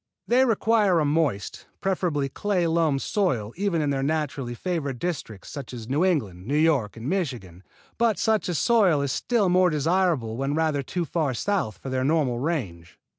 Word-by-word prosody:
They 255 +2 +4
require 220 -5 +3
a 155 - +1
moist, 145 - -1
preferably 175 -7 0
clay 185 +5 -1
loam 160 -3 +2
soil 130 - -1
even 180 -4 0
in 145 - 0
their 135 -1 -1
naturally 140 -4 -2
favored 145 -4 -3
districts, 130 - -5
such 135 -4 -7
as 115 -2 -8
New 140 +7 +1
England, 105 - -1
New 145 +3 +1
York 145 -10 +2
and 115 +3 -6
Michigan, 125 - -3 0.4
but 230 -2 +2
such 220 -4 +1
a 175 - -1
soil 185 -7 +3
is 140 - -1
still 230 - +1
more 180 0 +4
desirable 155 -7 +1
when 135 +2 -1
rather 155 -3 +1
too 170 +6 -3
far 150 -4 -1
south 185 - -1
for 135 - -7
their 130 0 -1
normal 140 -5 +1
range. 120 - -4
155 Hz, 175 wpm, -25 LUFS, 130-180 Hz, 0.4 s, They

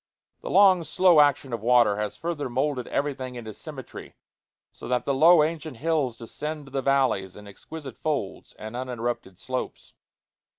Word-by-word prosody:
The - - -6
long, 190 -3 +5
slow 175 +1 +4
action 145 -3 +3
of 115 - -3
water 120 -3 +4
has 105 -1 -3
further 165 -5 -3
moulded 130 0 -1
everything 135 -3 -3
into 110 -3 -7
symmetry, - - -10 0.6
so - - -10
that 125 0 0
the 140 - +1
low 160 +3 +6
ancient 155 -4 -4
hills 145 -4 0
descend 150 +6 -6
to 135 - -14
the 135 0 -1
valleys 130 -9 +1
in 105 0 -12
exquisite 140 +7 -10
folds 145 -11 -3
and 110 +2 -9
uninterrupted 120 -6 -4
slopes. 130 +4 -5
135 Hz, 160 wpm, -25 LUFS, 120-150 Hz, 0.6 s, low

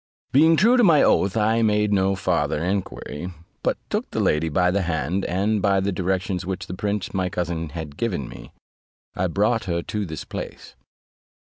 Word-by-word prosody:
Being 160 +4 +6
true 235 +8 +5
to 245 - +5
my 165 -8 +6
oath, 100 +3 +3
I 110 +2 +2
made 105 -1 +2
no 95 0 +2
farther 80 -5 0
enquiry, 90 -3 -3 0.3
but - - 0
took - - -2
the - - -3
lady 80 +2 +2
by 90 +3 +2
the 100 +2 +1
hand, 85 +2 -1
and 100 +4 0
by 100 -1 +3
the 100 +1 0
directions 95 0 -1
which 95 +1 -4
the - - -7
prince 100 +1 -3
my 95 -1 0
cousin 85 -2 -3
had 80 -2 -7
given 90 - -2
me, - - -11 0.6
I 90 - 0
brought 105 +6 +1
her 85 -2 -1
to 105 -1 -3
the 80 -2 -6
place. - - -7
95 Hz, 185 wpm, -23 LUFS, 85-105 Hz, 0.6 s, Being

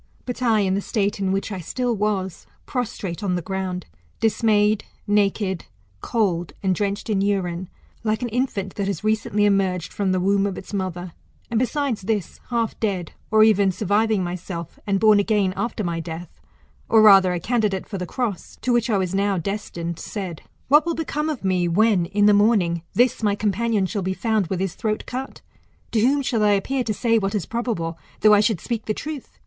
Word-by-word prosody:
But 250 0 -5
I, 225 -4 +3
in 190 -1 +1
the 200 - 0
state 205 -1 -1
in 190 -1 0
which 195 +2 -1
I 190 - -4
still 240 +7 -2
was, 195 -3 -2 0.2
prostrate 215 - -4
on 190 -3 0
the 175 - -1
ground, 190 -1 -3 0.3
dismayed, 215 -1 +2 0.2
naked, 200 -3 +1 0.4
cold, 180 -7 0
and 190 -1 +2
drenched 200 +3 -2
in 205 -3 +1
urine, 185 -3 -1 0.3
like 220 +1 0
an - - 0
infant 215 -5 -2
that 200 -1 -1
has 200 +1 -3
recently 210 -1 +1
emerged 195 -3 +1
from 195 -2 0
the 185 - +1
womb 200 +2 +2
of 195 - -4
its 190 - -9
mother, 180 -3 -3 0.4
and, 225 - +2
besides, 255 -2 -1
this, 200 -2 -2
half 230 -2 -1
dead, 190 -6 -2 0.2
or 215 0 +6
even 205 -3 +4
surviving 210 +2 +1
myself, 175 -1 -6
and 195 -1 +2
born 215 -1 +6
again 205 -2 +1
after, 225 -2 -2
my 170 -2 -2
death, 165 +1 -8 0.5
or 220 -1 +6
rather 195 -3 +7
a 175 - -1
candidate 210 -2 0
for 195 - -5
the 180 - -4
cross, 220 -2 -4
to 250 - +2
which 240 0 +2
I 210 - +3
was 185 -1 -1
now 200 0 +1
destined; 170 -2 -4
said. 185 -6 -5 0.3
What 295 +3 +6
will 335 0 -1
become 310 -1 -2
of 295 -9 -4
me, 180 -2 +2
when, 190 0 +3
in 205 +2 +2
the 210 - +6
morning, 200 -5 +3
this 245 0 +3
my 205 -2 +2
companion 215 0 0
shall 200 +2 -2
be 190 +1 -2
found 220 -4 0
with 185 +1 -2
his 195 -3 -1
throat 215 -2 -2
cut? 260 +2 -6 0.5
To 225 - +2
whom 275 +5 +3
shall 230 -4 0
I 205 -1 +5
appear 255 +7 0
to 220 - -1
say 230 +1 +2
what 195 +1 -2
is 195 -6 -1
probable, 215 -9 -3 0.2
though 215 -1 +7
I 205 - +6
should 210 -3 +2
speak 230 +2 -4
the 215 - -1
truth 295 -3 -7
205 Hz, 200 wpm, -23 LUFS, 185-225 Hz, 0.5 s, rather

